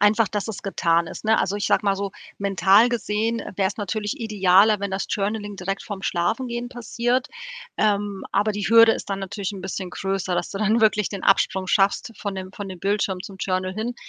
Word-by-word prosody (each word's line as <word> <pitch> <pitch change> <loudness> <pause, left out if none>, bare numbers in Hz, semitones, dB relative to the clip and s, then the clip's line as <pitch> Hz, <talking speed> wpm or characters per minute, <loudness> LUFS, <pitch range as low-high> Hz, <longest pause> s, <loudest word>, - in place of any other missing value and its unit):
Einfach, 210 +1 +4
dass 205 0 -3
es 220 -3 -6
getan 170 -4 +1
ist, - - -9
ne? 220 +1 +3
Also, 200 - -1
ich 205 - -2
sage - - +2
mal 195 -1 +2
so, 200 0 -4 0.3
mental 200 +3 +4
gesehen 230 -1 -1
wär's 195 0 0
natürlich 210 +6 -3
idealer, 210 -1 +4
wenn 200 -1 -4
das 190 - -2
Journaling 205 0 -2
direkt 195 +2 -3
vorm 200 -2 -7
Schlafengehen 240 +8 -1
passiert. 245 +1 -1 0.5
Ähm, 205 -2 0
aber 205 +2 +1
die 205 0 -4
Hürde 230 0 +7
ist - - -6
dann 195 - -1
natürlich 195 0 -4
'n 195 - -7
bisschen 190 0 -5
größer, 190 -1 -2
dass 175 - -2
du 195 - -5
dann 215 +3 +2
wirklich 210 -2 +3
den 200 -2 -6
Absprung 190 -1 +2
schaffst 195 +5 +2
von 200 -2 -4
dem 185 0 -6
von 205 -1 -7
dem 185 -1 -8
Bildschirm 195 0 -1
zum 195 -1 -10
Journal 185 0 -1
hin. 225 +3 -3
200 Hz, 205 wpm, -23 LUFS, 190-215 Hz, 0.5 s, Hürde